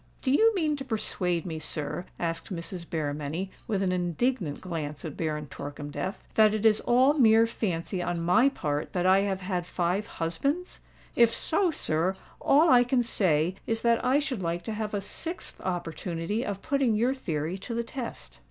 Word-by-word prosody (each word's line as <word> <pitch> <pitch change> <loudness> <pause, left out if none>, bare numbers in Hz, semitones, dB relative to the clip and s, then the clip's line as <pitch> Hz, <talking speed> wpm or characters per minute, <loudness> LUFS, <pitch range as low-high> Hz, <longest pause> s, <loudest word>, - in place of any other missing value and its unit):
"Do 260 - +1
you 445 +11 +5
mean 310 -5 +1
to 270 - -5
persuade 180 - 0
me, 160 -3 -4
sir," 155 +3 -3
asked 165 +4 -2
Mrs. 170 0 -5
Berrymenny, 155 +4 -3 0.2
with 200 -4 0
an 185 - +1
indignant 180 - -1
glance 155 -5 -5
at 155 - -5
Baron 150 -2 -2
Torkemdef, 145 +5 -6
"that 215 -1 +5
it 215 +1 -2
is 215 -1 +5
all 255 +4 +4
mere 225 -5 +6
fancy 185 -5 -2
on 175 -1 -2
my 180 +11 +4
part 150 - -3
that 180 -1 0
I 190 +1 +6
have 195 -1 -1
had 180 -2 -2
five 180 +4 -1
husbands? 275 - -2 0.4
If 235 -1 +5
so, 360 - +1
sir, 180 - 0 0.2
all 310 +4 +5
I 245 -1 +7
can 245 0 +2
say 175 -7 +1
is 225 -1 0
that 235 -1 +3
I 255 +2 +4
should 280 -8 -2
like 170 0 -2
to 220 - -4
have 215 -1 -3
a 200 - -1
sixth 330 - -7
opportunity 175 +3 -3
of 200 -3 -4
putting 275 -7 +2
your 240 +5 +2
theory 165 - -3
to 230 +4 -5
the 235 - 0
test." 65 - -7
190 Hz, 180 wpm, -28 LUFS, 165-240 Hz, 0.4 s, I